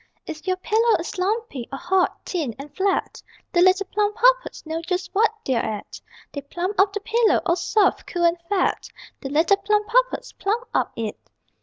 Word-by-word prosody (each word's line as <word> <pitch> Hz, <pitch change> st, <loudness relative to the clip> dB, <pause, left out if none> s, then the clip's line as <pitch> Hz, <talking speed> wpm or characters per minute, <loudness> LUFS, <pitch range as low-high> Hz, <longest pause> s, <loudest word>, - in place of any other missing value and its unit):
If 310 Hz, +4 st, -8 dB
your 370 Hz, 0 st, +1 dB
pillow 445 Hz, +5 st, +2 dB
is 350 Hz, +3 st, -6 dB
lumpy, 390 Hz, -, -2 dB
or 275 Hz, -, -4 dB
hot, 365 Hz, +4 st, 0 dB
thin 300 Hz, -, -3 dB
and 285 Hz, +1 st, -10 dB
flat, 390 Hz, +1 st, -1 dB, 0.3 s
The 350 Hz, -, +4 dB
little 375 Hz, +2 st, +4 dB
Plumpuppets 450 Hz, +5 st, +1 dB
know 320 Hz, +1 st, -3 dB
just 360 Hz, +2 st, -3 dB
what 435 Hz, +3 st, +4 dB, 0.2 s
they're 250 Hz, -3 st, +1 dB
at; 210 Hz, -2 st, -5 dB, 0.3 s
_They 285 Hz, -, -4 dB
plump 370 Hz, +4 st, -3 dB
up 390 Hz, +1 st, +5 dB
the 415 Hz, -, -3 dB
pillow, 455 Hz, +2 st, +3 dB
all 340 Hz, -, +3 dB
soft, 405 Hz, +3 st, +1 dB
cool 350 Hz, -1 st, -2 dB
and 340 Hz, 0 st, +2 dB
fat 400 Hz, -2 st, 0 dB, 0.3 s
_ -, -, -49 dB
_The 270 Hz, -, -5 dB
little 330 Hz, +7 st, +4 dB
Plumpuppets 425 Hz, +5 st, +1 dB
plump 450 Hz, +5 st, -1 dB
up -, -, +1 dB
it! 225 Hz, -2 st, -4 dB
380 Hz, 180 wpm, -23 LUFS, 335-420 Hz, 0.3 s, up